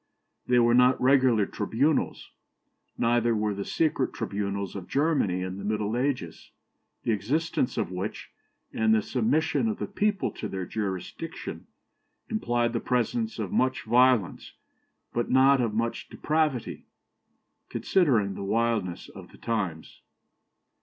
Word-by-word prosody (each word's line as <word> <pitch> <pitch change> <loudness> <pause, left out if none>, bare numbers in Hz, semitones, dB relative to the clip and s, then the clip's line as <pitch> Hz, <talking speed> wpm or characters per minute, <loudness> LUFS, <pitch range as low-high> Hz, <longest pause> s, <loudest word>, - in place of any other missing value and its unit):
They 125 - +3
were 120 -1 +4
not 125 +1 +5
regular 130 -5 +4
tribunals; 130 +11 -1 0.7
neither 120 0 +2
were 105 -1 0
the 100 0 -4
secret 150 -1 0
tribunals 100 -3 -3
of 95 -3 -6
Germany 140 - +1
in 95 +1 -5
the - - -7
Middle 105 +1 -1
Ages, 125 - -2 0.5
the - - 0
existence 130 - -1
of - - -1
which, 95 +3 -5 0.4
and 110 0 +3
the 110 - +1
submission 145 - +1
of 215 - -2
the - - -3
people 205 0 0
to - - -6
their 95 -1 -4
jurisdiction, 105 - -5 0.6
implied 120 - 0
the - - 0
presence 220 - -1
of - - -4
much 130 -9 +1
violence, 120 -3 +2 0.6
but 120 - -1
not 135 +1 +5
of 115 -3 -1
much 115 +1 -2
depravity, 155 -6 -1 0.8
considering 120 - +2
the 100 - -6
wildness 110 -4 -1
of - - -12
the - - -16
times. 95 -9 -4
120 Hz, 135 wpm, -27 LUFS, 105-135 Hz, 0.8 s, not